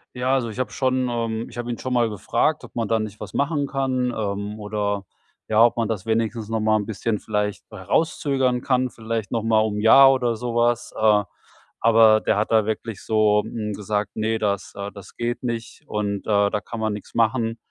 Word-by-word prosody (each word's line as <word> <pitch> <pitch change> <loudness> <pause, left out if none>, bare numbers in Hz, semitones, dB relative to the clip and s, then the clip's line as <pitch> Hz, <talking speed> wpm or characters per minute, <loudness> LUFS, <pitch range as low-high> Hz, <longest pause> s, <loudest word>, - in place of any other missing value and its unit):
Ja, 130 +2 +1
also, 120 -3 -1
ich 110 - -8
habe 120 -5 -2
schon, 130 -1 0
ähm 115 -1 -2
ich 120 - -12
habe 120 0 -3
ihn 115 - -5
schon 130 - -4
mal 120 -2 +3
gefragt, 120 +8 0
ob 125 - -13
man 115 -3 -1
da 115 -1 +1
nicht 110 -1 -5
was - - -8
machen 145 0 0
kann. 130 -3 -1
Ähm, 105 0 -3
oder, 105 -2 -2 0.4
ja, 110 +1 +5
ob 120 - +2
man 115 -2 +1
das 110 -2 -3
wenigstens 110 0 -1
noch 110 0 0
mal 110 0 +2
'n 105 -2 0
bisschen 110 +1 -2
vielleicht 105 -1 -2
herauszögern 135 -6 0
kann, 130 -1 +1
vielleicht 110 -2 -4
noch 115 -2 0
mal 110 -1 +3
um 105 -1 -1
'n - - -2
Jahr, 135 +4 +8
oder 120 -3 0
so 120 +1 -4
was. 120 0 +1
Äh, 105 -1 +4 0.6
aber 110 -1 +5
der - - +1
hat 110 - -1
da 110 -2 +4
wirklich 110 -1 -4
so, 105 -1 +3
hm, 105 -2 -4
gesagt: 105 0 -3
„Ne, 110 +1 0
das 100 -3 -2
äh, 100 0 -5
das 100 -2 -12
geht 120 +1 -2
nicht 115 +3 -5
und, 100 -1 -3
äh, 100 -1 +3
da 105 - -1
kann 115 - -7
man 110 -1 -1
nix 105 - -9
machen.“ 115 0 +1
110 Hz, 215 wpm, -23 LUFS, 105-120 Hz, 0.6 s, Jahr